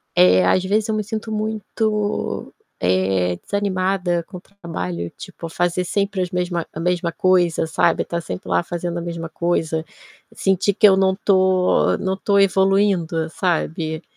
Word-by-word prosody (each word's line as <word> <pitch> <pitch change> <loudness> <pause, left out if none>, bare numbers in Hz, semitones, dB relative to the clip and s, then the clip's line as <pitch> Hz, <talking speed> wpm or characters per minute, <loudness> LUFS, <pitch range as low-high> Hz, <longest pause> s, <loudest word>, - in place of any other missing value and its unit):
eh, 90 0 +5
às 185 - +3
vezes 210 +3 0
eu 220 - +1
me 215 - -1
sinto 220 +1 -5
muito, 215 0 -2 0.3
eh, 95 -1 +1
desanimada 185 -3 -1
com 185 - -9
o - - -12
trabalho, 90 - -6
tipo 175 -3 -8
fazer 175 +2 0
sempre 200 +1 -1
as 180 - -1
mesma 180 -2 -2
mesma 175 0 0
coisa, 175 -2 +2
sabe, 160 - +1
tá 170 - -3
sempre 90 - -7
lá 85 -1 +2
fazendo 175 0 -4
a - - -5
mesma 170 -1 -5
coisa, 160 -1 -1 0.5
sentir 195 +1 +1
que 210 +2 +6
eu 195 - +6
não 190 0 +3
tô 190 -2 +3
não 190 -1 -1
tô 200 +1 +1
evoluindo, 190 -4 +2
sabe. 160 -2 -2
180 Hz, 155 wpm, -21 LUFS, 165-195 Hz, 0.5 s, que